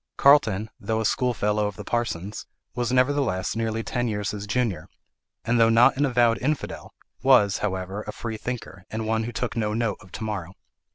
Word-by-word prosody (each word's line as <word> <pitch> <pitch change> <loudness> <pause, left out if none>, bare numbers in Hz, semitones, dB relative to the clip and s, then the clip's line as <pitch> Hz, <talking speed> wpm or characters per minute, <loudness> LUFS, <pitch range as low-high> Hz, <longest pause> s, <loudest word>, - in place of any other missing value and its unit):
Carlton, 110 -7 +4
though 110 -1 -1
a 110 - -1
schoolfellow 105 -3 +1
of 105 - -6
the 105 - -8
parson's, 105 -4 -3 0.3
was 120 0 -1
nevertheless 130 -8 +1
nearly 115 0 -1
ten 120 +1 -1
years 105 -2 -2
his 105 0 -6
junior; 105 -8 -1 0.6
and 120 +1 +2
though 115 0 +6
not 115 +3 +6
an 145 +2 +2
avowed 120 -2 +3
infidel, 150 +2 -3 0.3
was, 125 -6 +5
however, 95 0 -3
a - - -3
freethinker, 110 -4 -6
and 110 0 -3
one 110 0 0
who 120 - -4
took 120 +1 -3
no 105 -2 -1
note 115 -4 0
of 95 -3 -16
to 110 - -6
morrow. 100 -4 -4
110 Hz, 180 wpm, -25 LUFS, 105-120 Hz, 0.6 s, though